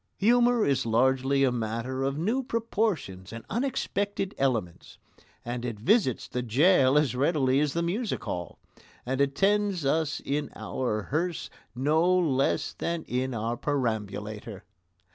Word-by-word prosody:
Humour 240 +1 +4
is 140 -2 +1
largely 130 +4 +2
a 130 - +3
matter 115 +3 -3
of 135 +1 -1
new 220 +12 0
proportions 215 - -2
and 115 0 -8
unexpected 205 -5 -1
elements. 115 -11 -2 0.5
And 120 0 -4
it 115 -4 -4
visits 135 - +2
the 125 - -3
gaol 135 - +4
as 145 -5 +2
readily 135 -1 +2
as 145 -1 +1
the 170 - 0
music 205 +7 -2
hall, 90 -1 -5 0.5
and 130 +2 -1
attends 195 +4 +1
us 155 +2 +1
in 145 +1 -2
our 110 -5 -2
hearse 165 - -2 0.2
no 150 +6 +2
less 145 -3 +1
than 170 -1 -3
in 130 0 -2
our 115 +2 -2
perambulator. 110 -6 -3
135 Hz, 135 wpm, -27 LUFS, 120-175 Hz, 0.5 s, Humour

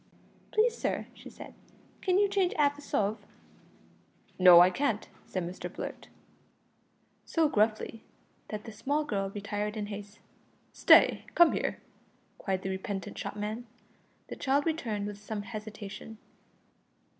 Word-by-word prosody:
"Please, 460 +2 +2
sir," - - -2
she - - -12
said, - - -11 0.5
"can 370 -1 +2
you 405 0 +4
change 390 -2 +1
'alf 290 -1 +3
a 290 - -12
sov?" 210 -5 -1 1.2
"No, 180 -2 +10
I 180 +1 +7
can't," 235 -1 -1 0.2
said 185 - -3
Mr 180 - -6
Blurt, - - -7 1.2
so 325 -2 +2
gruffly 220 -2 0 0.5
that 210 -1 -6
the 225 - -8
small 280 +8 -1
girl 195 -7 -1
retired 205 +1 -4
in 210 - -2
haste. 205 0 -9 0.6
"Stay! - - +6
come 345 -1 +7
here," - - -2 0.6
cried 190 -2 -2
the 190 - -2
repentant 190 0 -4
shopman. 215 +3 -5 0.6
The - - -6
child 280 +1 +1
returned 230 -11 -2
with 205 0 -6
some 210 0 -5
hesitation. 215 0 -8
215 Hz, 135 wpm, -30 LUFS, 205-285 Hz, 1.2 s, No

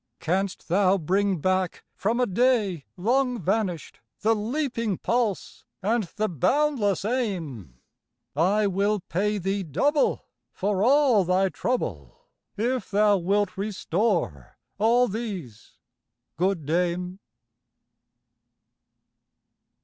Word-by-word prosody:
Canst 185 +3 -2
thou 190 +2 +3
bring 190 +3 +1
back 185 +1 0
from 225 +5 -1
a 250 - +3
day 205 - +1
long 250 +6 +1
vanished 190 -3 -2 0.2
The 225 +1 +3
leaping 230 - -2
pulse 235 -5 -1 0.2
and 220 +1 +1
the 215 0 0
boundless 210 - +1
aim? 165 - -3 0.6
I 195 +7 +2
will 200 +1 +1
pay 205 +5 -1
thee 195 +1 -1
double, 240 - +1 0.3
for 200 0 -1
all 260 -4 +4
thy 185 +2 +2
trouble, 110 - -4 0.3
If 240 +1 -1
thou 205 0 +4
wilt 200 +3 0
restore 190 - -2 0.2
all 240 +4 +4
these, 190 - -6 0.6
good 180 -2 0
dame. 180 +3 -1
200 Hz, 100 wpm, -25 LUFS, 180-225 Hz, 0.6 s, all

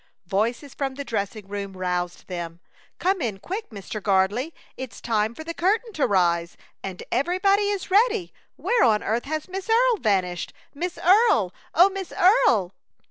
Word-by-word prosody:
Voices 230 - -1
from 270 -2 -3
the 280 +1 -6
dressing 205 -2 -3
room 200 -1 -5
roused 180 -1 -2
them. 170 -2 -6 0.4
"Come 375 -1 +1
in 220 -7 -2
quick, 385 - -5
Mr. 210 0 -7
Gardley; 200 - +1 0.2
it's 255 -6 -7
time 220 0 0
for 315 - -7
the 335 +1 -5
curtain 425 +7 0
to 300 - +1
rise, 170 -3 +1 0.2
and 190 -2 -6
everybody 380 - +2
is 400 -2 -3
ready. 425 -2 +3 0.2
Where 485 - +2
on 220 -4 +3
earth 230 +4 -1
has 310 +1 -3
Miss 380 +3 -6
Earle 475 +1 +4
vanished? 185 - 0 0.2
Miss 350 +5 -4
Earle! 380 - +4 0.2
Oh, 360 +4 +6
Miss 385 -2 -6
Earle!" 235 - +4
250 Hz, 160 wpm, -24 LUFS, -, 0.4 s, Oh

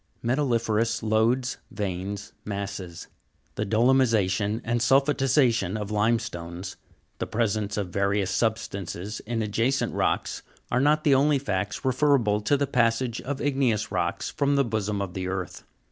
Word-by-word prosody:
21. - - -5
Metalliferous 115 -4 +1
lodes, 115 +4 +1
veins, 100 0 -4
masses. 100 -4 -5 0.5
The 105 - -3
dolomisa'tion 110 -3 +2
and 120 +1 0
the - - 0
sulphatisa'tion 135 -6 +3
of 105 0 -5
limestones, 100 -5 -1 0.4
the - - -2
presence 105 -2 -1
of 100 -3 -2
various 100 +1 0
sub 110 +2 +2
stances 100 0 -6
in 115 -1 -1
adjacent 115 +6 0
rocks, - - -1 0.3
are 125 - +2
not 150 +2 +3
the 145 - +4
only 140 +2 +4
facts 105 -2 -3
referable 130 -6 +2
to 140 +7 +2
the 140 - +1
passage 120 -1 +1
of 140 +1 -4
igneous 130 -7 +1
rocks - - -1
from 140 0 +1
the 140 -1 +3
bosom 105 -2 -1
of 90 -3 -6
the 95 0 -3
earth. 95 -1 -5
110 Hz, 145 wpm, -26 LUFS, 100-130 Hz, 0.5 s, the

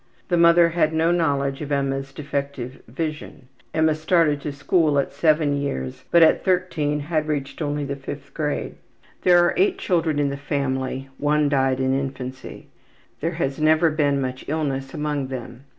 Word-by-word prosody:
The 175 - +2
mother 170 0 +6
had 160 -2 +1
no 160 +1 +2
knowledge 140 -5 0
of 150 -1 -5
Emma's 135 -1 -1
defective 140 -2 -5
vision. 150 0 -5 0.2
Emma 160 +1 +2
started 155 -2 +2
to 150 - -4
school 145 +1 +1
at 140 - 0
7 155 -3 +2
years, 65 - -4
but 170 -1 +6
at 160 - +4
13 170 -6 0
had 155 0 -1
reached 145 0 -3
only 145 -1 -1
the 140 0 -3
5th 140 +1 -8
grade. 150 -2 -3 0.4
There 180 -1 +5
are - - +1
8 - - -3
living 385 0 +3
children 165 - 0
in 145 -1 +1
the 140 - -4
family; 135 -2 -2
one 150 0 +2
died 135 -2 +1
in 130 0 +1
infancy. 135 -1 -5 0.5
There 165 +3 -2
has 140 -4 -2
never 155 +1 +4
been 145 -2 +1
much 130 -1 -4
illness 140 -3 -2
among 150 -3 -2
them. 125 0 -8
145 Hz, 170 wpm, -23 LUFS, 135-160 Hz, 0.5 s, mother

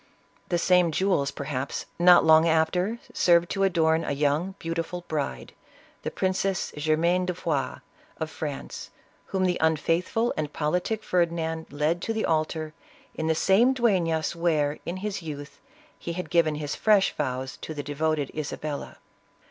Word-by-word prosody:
The 175 - +2
same 180 -1 +3
jewels, 170 -5 +1
perhaps, 140 -1 -4
not 175 0 +7
long 160 +1 +6
after 175 +7 +1 0.2
served 170 -1 +3
to 195 - -1
adorn 165 -4 +3
a - - -2
young, 150 +6 0
beautiful 165 +1 -4
bride, 140 - -3 0.5
the - - -3
Princess 190 0 -1
Germain 165 +4 +1
de 180 - -1
Foix 150 -6 -1 0.4
of 160 0 -3
France, 145 -3 -6 0.4
whom 190 -1 0
the 180 -1 0
unfaithful 165 +8 +1
and 150 -1 -3
politic 180 +9 -1
Ferdinand 165 -2 -1
led 150 +4 0
to 225 - -2
the 220 - -1
altar, 155 -1 -1 0.4
in 160 - -3
the 160 - +2
same 225 +10 +4
Dueflas, 170 -10 +1
where, 155 -4 +1
in 175 +2 -3
his 205 -3 -3
youth, 145 -3 -8 0.4
he 170 - -5
had 180 +1 -5
given 160 -3 +3
his 150 -1 -4
fresh 210 -3 +3
vows 130 0 -3
to 155 - -7
the 145 - -4
devoted 145 0 -1
Isabella. 150 -1 -5
165 Hz, 150 wpm, -26 LUFS, 150-180 Hz, 0.5 s, not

